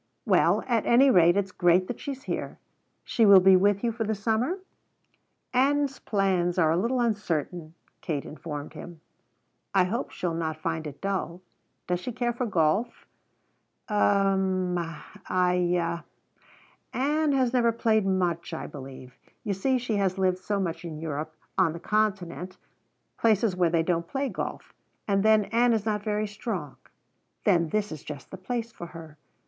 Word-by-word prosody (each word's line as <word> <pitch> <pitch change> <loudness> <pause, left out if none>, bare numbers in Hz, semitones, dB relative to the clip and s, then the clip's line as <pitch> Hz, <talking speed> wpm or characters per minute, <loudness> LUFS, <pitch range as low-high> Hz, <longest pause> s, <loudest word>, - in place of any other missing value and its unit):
Well, - - +3
at 235 -4 0
any 260 +3 +6
rate 175 -1 +5
it's 195 -2 -1
great 175 +1 +3
that 245 - -5
she's 275 -1 -6
here. - - -4 0.5
She 230 - +1
will 200 -3 +9
be 190 +1 +6
with 200 +2 +3
you 235 - +1
for 225 0 -3
the 220 0 -1
summer?" 225 - 0 1.0
"Ann's 275 +2 +2
plans 190 -4 0
are 160 -3 +4
a - - +2
little 235 +8 0
uncertain," 175 -7 -2 0.3
Kate 145 -4 -3
informed 150 -1 -7
him. 175 -2 -10 0.8
"I 190 - +6
hope 220 +8 -2
she'll 175 -2 -3
not 160 -1 -2
find 160 -1 -3
it 145 -1 -10
dull. 185 -3 -3 0.4
Does 180 0 -1
she 250 - -5
care 240 0 -1
for 240 +1 -2
golf?" 190 +5 0 0.9
"U - - 0
m, 190 -3 +2
I 175 +1 -1 0.9
Ann 300 +3 +1
has 260 -2 +1
never 235 -2 +3
played 220 -2 +2
much, 180 -3 -1
I - - -5
believe. 130 -2 -10 0.3
You 205 - -1
see 255 +8 +1
she 235 -4 -2
has 195 -1 0
lived 185 -1 +1
so 200 +2 -2
much 175 -3 -3
in 165 -3 -6
Europe 155 0 -5 0.2
on 170 -4 +3
the 170 - -7
Continent 190 -3 -1 0.6
places 220 -3 +2
where 180 -2 +2
they 165 0 +2
don't 170 0 -1
play 275 +4 -2
golf! - - -6 0.3
And 195 -1 +2
then 215 0 +4
Ann 235 +1 +4
is 220 -2 -1
not 210 -2 0
very 210 0 -1
strong." 205 - -5 0.7
"Then 170 -2 +3
this 210 +3 -1
is 155 -3 -7
just 145 -2 -9
the 190 - -7
place 230 +5 -4
for 175 - -8
her. 160 -3 -12
190 Hz, 165 wpm, -27 LUFS, 170-225 Hz, 1.0 s, will